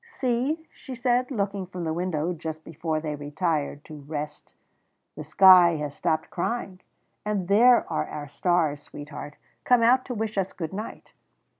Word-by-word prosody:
"See," 280 - -1
she 265 -3 -9
said, 250 0 +1
looking 200 -6 -2
from 180 -1 -6
the 160 -1 -1
window 175 -1 -1
just 160 -1 -6
before 160 0 -3
they 155 -1 -4
retired 150 0 -2
to 155 - -10
rest, 150 +1 -6 0.6
"the 155 - -6
sky 175 +2 +7
has 150 -2 -4
stopped 160 -1 -1
crying, 190 -1 -3 0.4
and 205 -4 -2
there 235 +5 +6
are 75 - -2
our 150 -1 -6
stars, 155 -2 0
sweetheart, 145 0 -9 0.3
come 245 -2 +4
out 255 +3 +5
to 250 - -5
wish 215 -2 -2
us 190 0 -2
good 165 0 -5
night. 215 +3 -7
175 Hz, 160 wpm, -26 LUFS, 155-220 Hz, 0.6 s, sky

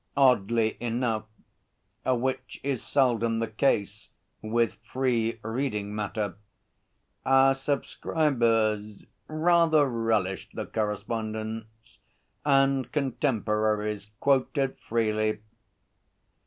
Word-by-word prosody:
Oddly 115 -4 +3
enough 115 -2 -1 0.8
which 130 +1 -1
is 135 -3 -1
seldom 115 -4 +2
the 115 - 0
case 105 -2 0 0.3
with 115 +1 +1 0.2
free 120 -3 0
reading 110 -3 -2
matter 105 -2 -3 0.9
our 135 0 +5
subscribers 115 -7 0 0.2
rather 160 -1 +4
relished 115 -6 -1
the - - -3
correspondence, 110 +1 -4 0.4
and 135 -3 +3
contemporaries 105 -7 0
quoted 135 0 +1
freely. 110 -1 0
115 Hz, 75 wpm, -27 LUFS, 110-135 Hz, 0.9 s, our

